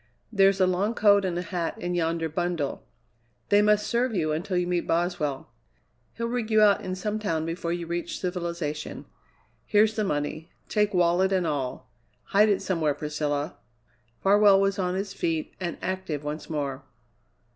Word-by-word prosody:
There's 195 -1 +4
a 185 - +5
long 190 +5 0
coat 200 -3 +5
and 175 -2 -1
a 175 - -2
hat 175 -3 -3
in 175 0 -3
yonder 165 -1 0
bundle. 160 - -2 0.6
They 205 0 +5
must 210 0 +3
serve 240 -1 0
you 155 -4 0
until 180 +4 -1
you 180 - +1
meet 175 -1 -1
Boswell. 165 -7 -1 0.6
He'll 230 - -3
rig 235 -2 -2
you 220 -1 +4
out 210 -2 +5
in 185 0 -4
some 210 +3 -3
town 165 -7 -1
before 170 0 -3
you 175 0 -3
reach 170 +1 -4
civilization. 170 -4 -4 0.6
Here's 215 +1 +3
the 215 - 0
money; 155 -1 -2 0.2
take 210 -2 +1
wallet 180 +2 +3
and 185 -2 +1
all. 135 -5 -3 0.3
Hide 210 +2 +4
it 200 - +1
somewhere, 160 -6 0
Priscilla." 150 -1 -2 0.7
Farwell 200 0 +6
was 195 +1 +1
on 180 -1 0
his 195 +1 -3
feet 165 -4 -2
and 175 -3 -3
active 185 -6 -3
once 150 +1 -5
more. 140 -3 -3
180 Hz, 170 wpm, -26 LUFS, 160-200 Hz, 0.7 s, Farwell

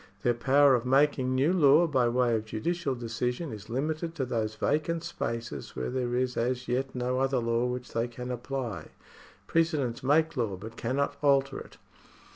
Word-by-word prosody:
Their 120 - +3
power 135 +4 +4
of 120 -2 +2
making 130 0 +2
new 140 +7 +3
law 155 -1 +6
by 130 -6 +2
way 120 0 +2
of 110 -1 -1
judicial 140 +6 -2
decision 125 +5 -3
is 105 0 -9
limited 155 +6 -2
to 135 -5 -1
those 110 -3 -2
vacant 155 +7 0
spaces 115 -6 -5
where 65 - -3
there 125 -1 -1
is 125 0 0
as 125 +2 -1
yet 130 +2 -1
no 125 +1 -1
other 135 0 +1
law 115 0 +1
which 125 0 -5
they 115 +1 0
can 125 +1 -6
apply. 125 -1 -4 0.6
Precedents 155 -8 0
make 155 +4 +2
law, 110 -7 -1
but 110 +4 -9
cannot 135 +5 -1
alter 140 -1 +2
it. - - -12
125 Hz, 175 wpm, -29 LUFS, 120-140 Hz, 0.6 s, law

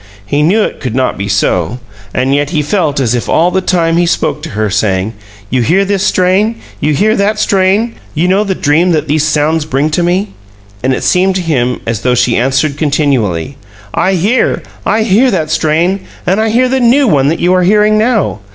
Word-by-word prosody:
He 145 +8 0
knew 195 +8 +2
it - - -4
could 125 -4 -4
not 130 -1 0
be 100 +1 -4
so, 95 +1 0 0.3
and 130 +4 0
yet 145 0 0
he 155 -2 -1
felt 150 -3 -1
as 125 -4 0
if 120 - -3
all 170 +2 +2
the 190 - 0
time 170 -3 +1
he 175 0 +2
spoke 150 -3 -1
to 165 - -7
her, 110 0 +1
saying: 100 0 -1 0.4
"You 130 - +1
hear 185 - +2
this 195 -1 -1
strain? 190 +3 +1 0.2
You 150 0 0
hear 215 +7 +2
that 210 +1 0
strain? 205 +3 +1 0.2
You 165 +4 +1
know 195 +3 +2
the 195 -2 -2
dream 170 +5 +2
that 155 -1 -1
these 150 +1 +1
sounds 155 +1 +1
bring 150 +1 -1
to 165 - 0
me?" 180 +4 0 0.5
And 130 - 0
it 130 - -2
seemed 185 +1 +2
to 190 - -1
him 125 -7 -1
as 115 -1 -3
though 125 -1 +1
she 120 0 +1
answered 135 +3 0
continually: 140 - -1 0.4
"I 190 - +1
hear! 205 +8 0 0.2
I 220 0 +2
hear 225 +5 +3
that 160 -8 -1
strain, 165 +5 +1 0.3
and 190 +4 +1
I 220 - +1
hear 245 +4 +2
the 265 +1 0
new 255 +3 +3
one 140 -9 +2
that 160 - 0
you 180 +1 +2
are 185 - +3
hearing 210 +3 +3
now. 215 - 0
165 Hz, 215 wpm, -12 LUFS, 135-195 Hz, 0.5 s, hear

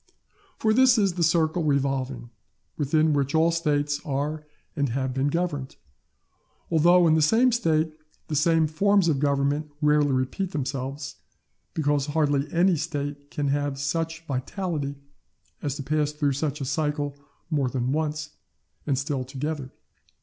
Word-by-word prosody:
For 220 -1 +2
this 255 0 +5
is 200 -4 +2
the 175 - -4
circle 165 +1 +2
revolving 135 -4 -1 0.4
within 155 +2 +2
which 140 +1 0
all 165 +1 +4
States 145 -3 0
are 150 +2 -3 0.3
and 140 -3 0
have 130 +1 -2
been 135 +2 0
governed; 145 -4 -2 1.0
although 175 +2 +5
in 160 - +5
the 160 - +3
same 230 +11 +4
State 160 -8 +1 0.3
the 155 - -3
same 160 +2 +3
forms 195 +4 +2
of 150 -5 +2
Government 145 +1 0
rarely 150 -1 +3
repeat 130 +9 -1
themselves, 135 0 -4 0.6
because 145 -2 +1
hardly 145 -2 +1
any 175 +1 +3
State 145 -2 -4
can 145 -1 -2
have 145 0 -1
such 165 +3 -2
vitality 145 +1 -3 0.7
as 145 -2 -2
to 145 - -5
pass 150 +1 0
through 150 -2 0
such 145 +1 -2
a - - -2
cycle 145 0 -1 0.4
more 140 -4 +1
than 125 0 -1
once, 155 +1 -2 0.6
and 140 -3 +1
still 140 -1 -2
together. 135 +1 -4
150 Hz, 145 wpm, -25 LUFS, 140-160 Hz, 1.0 s, this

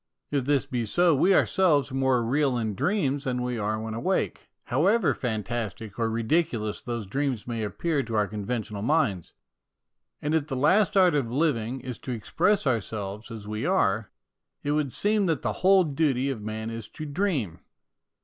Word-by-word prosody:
If 140 -3 0
this 145 0 +2
be 125 -4 -2
so, 175 +8 +4
we 180 +7 +4
ourselves 150 -10 +3
are - - -8
more 130 -2 +2
real 135 +2 +1
in 110 -3 -1
dreams 145 - 0
than 125 -1 -1
we 125 -2 -2
are 110 +1 -1
when 110 0 -5
awake, 115 - -1 0.2
however 180 - +2
fantastic 110 -2 -4
or 115 -1 +1
ridiculous 115 -2 0
those 120 -4 -4
dreams 130 +1 -2
may 115 -2 -3
appear 150 +8 -1
to 115 -4 -5
our 105 -1 +2
conventional 105 0 -4
minds. 115 - 0 0.9
And 150 +1 -2
if 155 -2 +1
the 135 - -3
last 195 +9 +3
art 185 -2 +6
of 135 -6 0
living 130 -4 0
is 125 -2 -6
to 130 - -5
express 175 - +1
ourselves 110 -3 -2
as 110 -3 -8
we 110 +1 -3
are, 110 - +1 0.5
it 145 - 0
would 150 -3 0
seem 205 - +1
that 165 -3 0
the - - 0
whole 190 0 +6
duty 140 -3 +1
of 120 -5 -5
man 110 +1 -4
is 115 -2 -6
to 155 - -8
dream. 140 - -1
130 Hz, 180 wpm, -26 LUFS, 110-150 Hz, 0.9 s, art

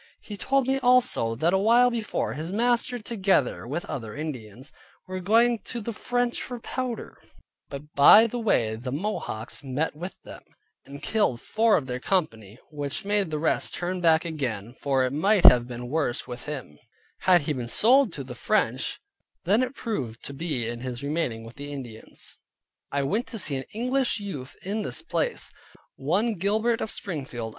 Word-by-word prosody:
He 210 - -8
told 270 +6 +1
me 270 0 +2
also, 245 - +4
that 165 +9 +1
awhile 230 +6 +5
before, 230 -3 -2
his 160 +4 -5
master 240 +3 +1
(together 195 - 0
with 155 +7 -3
other 115 -6 -6
Indians) 130 -4 -7 0.3
were 185 0 -5
going 230 +5 +3
to 240 - -5
the 230 +1 -4
French 245 +2 -1
for 245 -1 -6
powder; 245 -1 -5 0.5
but 145 +2 -9
by 205 +10 +8
the 240 +2 -3
way 115 - +1
the 125 +3 -6
Mohawks 145 - -4
met 140 +4 -2
with 175 +4 -6
them, - - -10 0.5
and 140 +1 -10
killed 205 - +1
four 220 - +3
of 140 - -3
their 125 -1 -4
company, 115 - -1
which 145 +6 -4
made 205 -3 +1
the 155 - -2
rest 155 +1 +1
turn 180 +1 -3
back 165 -1 +4
again, 125 -9 -3
for 135 -1 0
it 130 - -2
might 195 +5 +3
have 120 -1 +8
been 120 0 -6
worse 145 -3 -1
with 120 0 -7
him, 130 - -6 0.4
had 180 -2 +5
he 150 +1 -1
been 125 -4 -4
sold 245 - +5
to 140 - -5
the 125 -1 -8
French, 120 - 0 0.4
than 205 +7 +3
it 255 +1 -2
proved 130 - -4
to 140 - -4
be 140 -5 -2
in 120 0 -4
his 125 0 -5
remaining 140 -7 -2
with 115 +1 -12
the 145 +1 -7
Indians. 120 -6 -9 0.5
I 140 0 0
went 210 - -1
to 230 - -7
see 155 -8 0
an 130 - -4
English 250 +1 0
youth 145 -10 -7
in 205 +4 -2
this - - -4
place, 480 +8 -1 0.4
one 185 - +1
John 205 - -6
Gilbert 220 +5 +1
of - - -2
Springfield. 135 - -4
160 Hz, 180 wpm, -26 LUFS, -, 0.5 s, by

